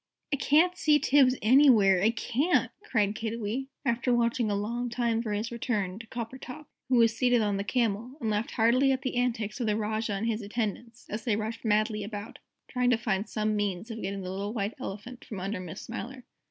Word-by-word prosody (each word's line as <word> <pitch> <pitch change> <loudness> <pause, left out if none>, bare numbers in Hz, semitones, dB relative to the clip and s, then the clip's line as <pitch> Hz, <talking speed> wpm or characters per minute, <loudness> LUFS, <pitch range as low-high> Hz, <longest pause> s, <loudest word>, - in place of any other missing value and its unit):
"I - - +5
can't 315 +6 +3
see 305 -4 +4
Tibbs 270 -3 +4
anywhere, 220 -7 +6
I 215 - +4
can't!" 245 +8 +1
cried 210 - +1
Kiddiwee, 225 +3 -3 0.2
after 240 0 +1
watching 235 -1 +2
a 205 - 0
long 235 +4 -2
time 235 -1 0
for 220 -2 -4
his 210 +3 -2
return, 215 -5 -2
to 230 - -10
Coppertop, 250 +5 -7 0.2
who 260 - +3
was 230 -1 +4
seated 245 -2 +3
on 205 -1 0
the 200 - -2
Camel 235 +3 -1
and 225 -5 -1
laughing 210 +2 -1
heartily 250 +4 +4
at 265 +1 -1
the 260 - -2
antics 235 -3 -1
of 240 - -1
the 210 0 +1
Rajah 215 0 -1
and 200 +3 -2
his 230 -1 -1
attendants, 230 +2 -4
as 215 +1 -4
they 225 -3 +1
rushed 220 +2 -4
madly 215 -1 +1
about, 205 +1 -7 0.3
trying 250 -1 +1
to 245 - +4
find 210 -3 -1
some 215 -1 0
means 205 +1 -2
of 225 0 -6
getting 195 +1 -3
the 185 0 -5
little 200 +2 -4
White 210 -1 -2
Elephant 240 +1 -7
from 205 - -7
under 195 +2 -3
Miss 185 +1 -7
Smiler. 245 +2 -7
225 Hz, 205 wpm, -28 LUFS, 210-245 Hz, 0.3 s, anywhere